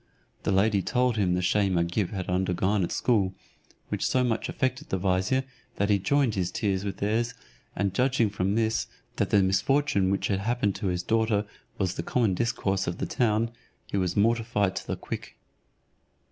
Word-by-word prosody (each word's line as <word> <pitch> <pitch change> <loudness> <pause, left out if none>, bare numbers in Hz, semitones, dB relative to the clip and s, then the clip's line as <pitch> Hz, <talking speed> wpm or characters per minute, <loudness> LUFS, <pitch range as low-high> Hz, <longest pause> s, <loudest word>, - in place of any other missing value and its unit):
The - - -1
lady 100 +1 +3
told 125 +2 +1
him 90 -4 +2
the 90 - -1
shame 95 0 +2
Agib 85 +3 0
had 95 -3 -4
undergone 95 +2 +1
at 85 - -2
school, 100 -6 +1 0.5
which - - -1
so 130 - +2
much 115 -2 -1
affected 130 +3 -2
the 95 - 0
vizier 95 +8 +1 0.3
that 100 +1 +1
he 100 - +4
joined 140 +1 +2
his 90 -3 -1
tears 95 0 -1
with 100 -1 -4
theirs, 115 +4 0 0.4
and 100 -2 0
judging 125 -2 +2
from 100 0 0
this 110 0 +1 0.3
that - - +1
the 100 -2 +4
misfortune 100 +2 +2
which 95 - 0
had 100 -2 +1
happened 110 -1 0
to 105 - -2
his 90 -1 -1
daughter 110 0 +1 0.3
was 95 -3 0
the - - -3
common 115 -6 +1
discourse 95 -3 0
of 85 +1 -2
the - - -2
town, 115 -1 +1 0.3
he - - -6
was 90 -1 0
mortified 110 -2 +2
to - - -5
the - - -2
quick. - - -7
100 Hz, 185 wpm, -27 LUFS, 95-115 Hz, 0.5 s, he